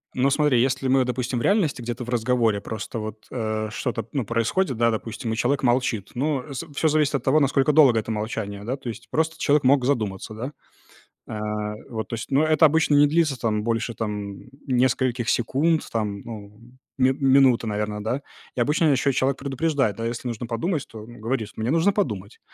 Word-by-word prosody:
Ну, 130 +2 +3
смотри, 140 -4 +3
если 135 +1 0
мы, 130 0 +3
допустим, 125 0 -2
в - - -3
реальности 170 - +1
где-то 120 +1 -4
в 120 - -9
разговоре 115 -3 +1
просто 110 +2 -5
вот, 110 0 -7
э, 110 -2 -2
что-то 115 -1 -3
ну 135 -5 -1
происходит, 115 - 0
да, 115 0 +3
допустим, 110 +1 -4
и - - -2
человек 135 +4 0
молчит. 120 -5 +1
Ну, 140 +1 0
э, 140 - -12 0.2
всё 160 - +2
зависит 150 -2 +2
от 135 - -2
того, 140 +4 +4
насколько 140 0 +3
долго 140 -5 +7
это 110 - -6
молчание, 105 -2 -4
да. 125 +4 -2
То 130 - -7
есть, 115 - -8
просто 160 +1 0
человек 145 -1 +3
мог 130 -1 +4
задуматься, 110 -7 -1
да. 125 +6 -5 0.8
Э, 105 0 -3 0.2
вот 110 -2 -4
то - - -9
есть. 115 +4 -7
Ну 140 +3 +4
это 155 0 +5
обычно 155 -1 +3
не 145 0 +6
длится 155 -2 +2
там 105 -3 -1
больше 115 +1 -1
там, 105 -2 -4 0.3
нескольких 125 -2 +1
секунд 150 +7 +1
там, 105 -3 -2
ну 105 -2 -9 0.4
ми 130 0 +4
минуты, 135 -3 +4
наверное, 105 0 -2
да. 120 +6 -2 0.3
И 125 - 0
обычно 150 +6 +2
еще 140 +1 +2
человек 135 +2 +1
предупреждает, 135 -5 0
да, 115 - -3
если 120 +1 -4
нужно 115 0 -4
подумать, 145 +7 -2
то 110 - -10
он 120 +1 -13
говорит: 115 -1 -2
мне 110 +2 -2
нужно 165 +5 +3
подумать. 105 - -3
125 Hz, 195 wpm, -24 LUFS, 110-140 Hz, 0.8 s, долго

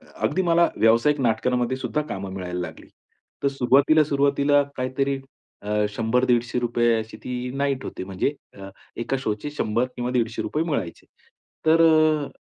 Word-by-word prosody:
अ, - - -22 0.2
अगदी 190 - 0
मला 170 0 +3
व्यावसायिक 115 +7 +3
नाटकांमध्ये 125 +1 0
सुद्धा 150 +3 -2
कामं 95 0 -5
मिळायला 90 -1 -4
लागली. 85 - -7 0.6
तर 140 - +3
सुरुवातीला, 140 +4 +4
सुरुवातीला 140 0 +2
काहीतरी 135 +2 -1 0.4
अ, 105 - -5 0.2
₹100-150 120 +1 +1
अशी 110 0 -7
ती 125 0 -4
नाईट 140 -1 -1
होती, - - -6
म्हणजे 95 +8 -1 0.3
अ, 95 0 -8 0.3
1 120 - -5
का 135 - +2
शोचे 110 +3 -3
100 120 -4 0
किंवा 120 0 -2
₹150 120 +5 -1
मिळायचे. 115 - -4 0.6
तर 165 +1 +5
अ, 155 -2 +3
125 Hz, 145 wpm, -24 LUFS, 115-145 Hz, 0.6 s, तर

